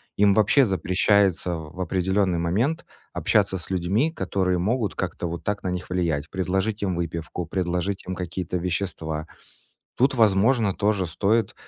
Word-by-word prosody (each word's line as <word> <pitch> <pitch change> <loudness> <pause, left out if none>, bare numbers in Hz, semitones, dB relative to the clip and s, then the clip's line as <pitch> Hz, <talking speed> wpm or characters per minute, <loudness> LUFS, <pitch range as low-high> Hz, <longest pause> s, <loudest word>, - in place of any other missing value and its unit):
им 100 -1 +4
вообще 110 +6 +4
запрещается 95 -2 +2
в 80 +2 -9
определённый 95 0 +1
момент 115 - 0 0.3
общаться 100 -2 +2
с 85 - -6
людьми, 95 - +1
которые 95 - 0
могут 105 +4 0
как-то 85 - -3
вот 85 0 -5
так 105 0 -2
на 95 - -1
них 90 -1 -5
влиять: 85 -4 -1
предложить 95 +3 -1
им 95 -3 0
выпивку, 85 0 -4
предложить 90 +2 -2
им 95 - -3
какие-то 90 0 -3
вещества. 85 -3 -3 0.7
Тут, 135 +3 +3
возможно, 110 -1 +3
тоже 100 -2 +1
стоит 100 +6 +1
95 Hz, 145 wpm, -24 LUFS, 85-105 Hz, 0.7 s, им